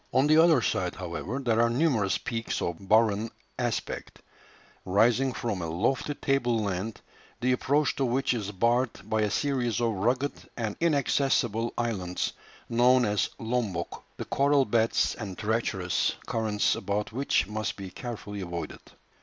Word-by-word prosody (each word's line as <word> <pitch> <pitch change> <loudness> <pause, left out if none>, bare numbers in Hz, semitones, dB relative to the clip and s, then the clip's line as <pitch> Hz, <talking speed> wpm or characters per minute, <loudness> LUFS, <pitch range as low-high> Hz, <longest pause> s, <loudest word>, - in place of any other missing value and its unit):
On 130 +2 +3
the 155 +1 +5
other 160 -7 +5
side, 90 -1 0
however, 90 +6 -4
there 115 -4 +1
are 115 - +4
numerous 120 -7 +2
peaks 115 -1 -3
of 85 +3 -4
barren 110 0 +3 0.3
aspect, 120 -3 -3 0.6
rising 115 +7 +3
from 115 -6 -3
a 85 - -3
lofty 130 - 0
table 130 -5 +1
land, 100 +1 -3 0.4
the 125 +1 +1
approach 140 +3 +2
to 135 - +1
which 130 +2 +1
is 105 -5 -3
barred 115 +1 0
by 110 0 +1
a 105 - +2
series 125 +1 0
of 115 -2 +1
rugged 125 +8 0 0.2
and 110 -3 -2
inaccessible 135 -7 +1
islands, 95 -7 -2 0.3
known 125 +1 +4
as 105 -1 +1
Lombok, 110 -7 -2
the - - -5
coral 140 0 +3
beds 115 0 +2
and 100 -5 -6
treacherous 105 -4 0
currents 110 -2 +1
about 105 +1 -2
which 130 - +1
must 105 +1 -3
be 95 -2 -8
carefully 105 -2 -6
avoided. 85 -2 -5
115 Hz, 145 wpm, -28 LUFS, 100-125 Hz, 0.6 s, the